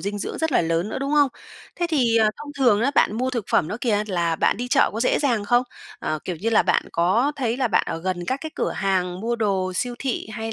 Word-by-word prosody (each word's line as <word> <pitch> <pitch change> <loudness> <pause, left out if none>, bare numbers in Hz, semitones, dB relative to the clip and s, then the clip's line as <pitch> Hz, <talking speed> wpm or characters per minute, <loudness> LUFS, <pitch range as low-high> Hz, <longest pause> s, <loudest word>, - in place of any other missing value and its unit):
dinh 205 +1 -3
dưỡng - - -5
rất 320 -2 -1
là - - +4
lớn 165 +3 0
nữa, 220 - -4
đúng 275 +2 -2
không? 290 -2 +5 0.5
Thế 350 - 0
thì, 250 -8 +2
à, 215 -1 +4
thông 295 -1 -9
thường 240 -6 +4
á 255 +5 +2
bạn 215 - +3
mua 255 +2 0
thực 235 -5 -3
phẩm 155 - +2
đó 210 - -3
kìa, 210 -4 +1
là 170 -4 0
bạn - - +2
đi 245 +3 -4
chợ 275 +1 +3
có 220 - -4
dễ 250 - +2
dàng 240 -8 0
không? 240 +4 +3 0.4
À, 155 0 -2
kiểu 180 - -4
như 220 +8 -2
là, 225 - +4
bạn - - +2
có 215 +12 +2
thấy 240 -3 -1
là 255 -2 0
bạn 200 - +3
ở - - -3
gần 180 0 -3
các 260 +2 -1
cái 315 - -5
cửa - - -1
hàng 185 -2 -1
mua 235 +2 -1
đồ 195 -4 0
siêu 245 +6 -2
thị 265 -3 -3
hay 225 +1 -4
225 Hz, 275 wpm, -23 LUFS, 190-255 Hz, 0.5 s, không